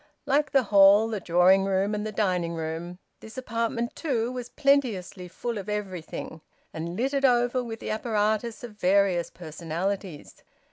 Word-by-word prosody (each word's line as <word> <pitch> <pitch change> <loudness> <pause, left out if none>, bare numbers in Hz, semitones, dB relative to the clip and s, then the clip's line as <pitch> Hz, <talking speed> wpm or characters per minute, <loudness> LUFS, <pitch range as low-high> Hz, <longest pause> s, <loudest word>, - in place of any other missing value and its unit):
Like 295 +2 +2
the 270 -2 +3
hall, 200 +1 +6
the 215 -2 -3
drawing 180 +2 +4
room, 195 +1 0
and 210 0 -2
the - - -4
dining 180 -5 -1
room, 165 +2 -5 0.2
this 220 +2 -12
apartment 230 -1 -2
too 245 -7 -1
was 250 -1 -6
plenteously 240 -12 0
full 230 +5 -4
of 200 +1 -7
everything, 185 -6 -5 0.3
and 165 +2 -5
littered 275 +3 0
over 245 -1 +3
with 225 -2 -7
the - - -5
apparatus 215 +1 -1
of 240 - -7
various 185 -2 +2
personalities. 170 +1 -5
210 Hz, 150 wpm, -26 LUFS, 180-235 Hz, 0.3 s, hall